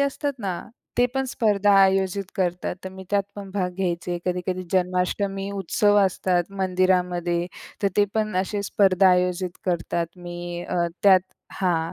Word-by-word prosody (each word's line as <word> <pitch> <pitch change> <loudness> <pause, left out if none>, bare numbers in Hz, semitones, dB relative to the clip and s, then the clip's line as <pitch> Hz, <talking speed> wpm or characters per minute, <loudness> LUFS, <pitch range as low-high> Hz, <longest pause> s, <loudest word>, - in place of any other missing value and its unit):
असतात 280 +1 0
ना 190 -5 -3 0.4
ते 245 - +6
पण 265 0 +1
स्पर्धा 205 -4 +2
आयोजित 195 0 +2
करतात. 180 -2 -1
तर - - -3
मी 190 0 -10
त्यात 200 -1 +3
पण 200 -1 -7
भाग 185 -3 0
घ्यायचे. 175 -2 -2
कधी-कधी 180 0 -2
जन्माष्टमी 190 +2 0
उत्सव 205 +2 +2
असतात 185 -1 0
मंदिरामध्ये. 180 -2 +1 0.4
तर 200 - +4
ते 205 - +5
पण 215 -3 0
असे 195 +2 -1
स्पर्धा 195 -1 +4
आयोजित 180 0 0
करतात. 170 -1 -1
मी 175 0 -6
अ, - - -2 0.3
त्यात 190 -2 +7 0.4
हां. 165 -3 +1
185 Hz, 145 wpm, -24 LUFS, 180-200 Hz, 0.4 s, त्यात